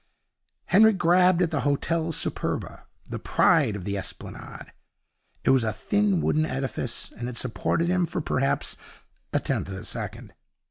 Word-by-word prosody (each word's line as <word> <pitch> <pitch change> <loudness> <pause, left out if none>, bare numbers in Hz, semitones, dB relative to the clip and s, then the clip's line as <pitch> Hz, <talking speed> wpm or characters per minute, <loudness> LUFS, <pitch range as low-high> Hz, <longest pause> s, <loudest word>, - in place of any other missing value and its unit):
Henry 220 +4 +6
grabbed 180 0 +4
at 170 - 0
the 155 - 0
Hotel 160 +4 0
Superba, - - -3 0.2
the - - -5
pride 105 - +3
of 95 -3 -6
the 100 -1 -2
Esplanade. 95 - -8 0.7
It - - +4
was 130 -3 +4
a 110 - 0
thin 200 - +1
wooden 155 - +2
edifice, 130 -2 -3
and 120 +1 -4
it 120 - -6
supported 130 +7 0
him 180 -1 +2
for - - -3
perhaps 135 -3 0 0.5
a - - +2
tenth - - -1
of 95 - -6
a 95 +3 -8
second. 110 -1 -5
140 Hz, 155 wpm, -26 LUFS, 115-175 Hz, 0.7 s, Henry